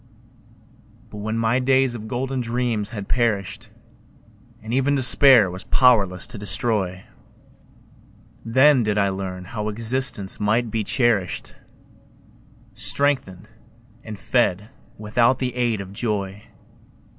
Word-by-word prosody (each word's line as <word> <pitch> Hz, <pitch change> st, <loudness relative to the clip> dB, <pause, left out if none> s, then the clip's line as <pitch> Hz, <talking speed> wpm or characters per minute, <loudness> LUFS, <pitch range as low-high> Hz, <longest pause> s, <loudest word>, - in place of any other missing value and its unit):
But 105 Hz, -, -9 dB
when 110 Hz, +2 st, -4 dB
my 115 Hz, +2 st, +1 dB
days 130 Hz, -1 st, +2 dB
of 110 Hz, -2 st, -8 dB
golden 130 Hz, +2 st, -3 dB
dreams 115 Hz, -3 st, -2 dB
had 105 Hz, -3 st, -7 dB
perished, 110 Hz, -2 st, -2 dB, 0.9 s
And 110 Hz, +2 st, -6 dB
even 135 Hz, +2 st, +1 dB
Despair 130 Hz, -5 st, +5 dB
was 95 Hz, +1 st, -7 dB
powerless 105 Hz, -9 st, +3 dB
to 110 Hz, -, -7 dB
destroy, 100 Hz, -3 st, -1 dB, 1.4 s
Then 130 Hz, +4 st, +4 dB
did 105 Hz, -2 st, -1 dB
I 100 Hz, -1 st, +2 dB
learn 95 Hz, -1 st, -6 dB
how 105 Hz, +2 st, -4 dB
existence 115 Hz, -2 st, 0 dB
might 110 Hz, +2 st, 0 dB
be 110 Hz, -2 st, -1 dB
cherished, 105 Hz, -5 st, -1 dB, 1.2 s
Strengthened 110 Hz, -3 st, -1 dB, 0.6 s
and 110 Hz, -2 st, -8 dB
fed 110 Hz, -3 st, -1 dB, 0.3 s
without 115 Hz, +4 st, +1 dB
the 130 Hz, -2 st, -3 dB
aid 120 Hz, -4 st, -1 dB
of 95 Hz, 0 st, -10 dB
joy. 100 Hz, -2 st, -4 dB
110 Hz, 115 wpm, -22 LUFS, 100-125 Hz, 1.4 s, Despair